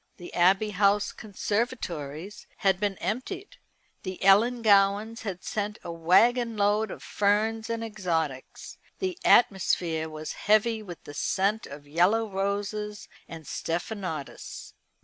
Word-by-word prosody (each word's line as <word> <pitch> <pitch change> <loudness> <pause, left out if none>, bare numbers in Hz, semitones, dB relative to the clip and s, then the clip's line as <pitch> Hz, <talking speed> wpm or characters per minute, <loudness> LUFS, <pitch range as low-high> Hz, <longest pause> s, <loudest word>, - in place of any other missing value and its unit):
The 175 - -10
Abbey 195 +4 +3
House 205 +1 +2
conservatories 200 - -4 0.2
had 190 -1 +4
been 200 -2 -1
emptied 385 - -4 0.4
the 185 -1 -5
Ellangowans 210 0 +4
had 190 -4 -5
sent 210 0 -3
a 170 - -5
waggon 225 +8 +3
load 205 +1 +2
of - - -8
ferns 220 +2 +1
and 230 0 -2
exotics. 165 -11 -3 0.2
The 375 -2 -2
atmosphere 170 -6 +3
was 155 0 -6 0.2
heavy 220 +1 +4
with 180 -5 -10
the 145 - -10
scent 200 +8 0
of 145 +1 -11
yellow 185 +9 +2
roses 205 +1 -3 0.2
and 165 -2 -9
stephanotis. 170 -2 -5
200 Hz, 120 wpm, -27 LUFS, 175-220 Hz, 0.4 s, had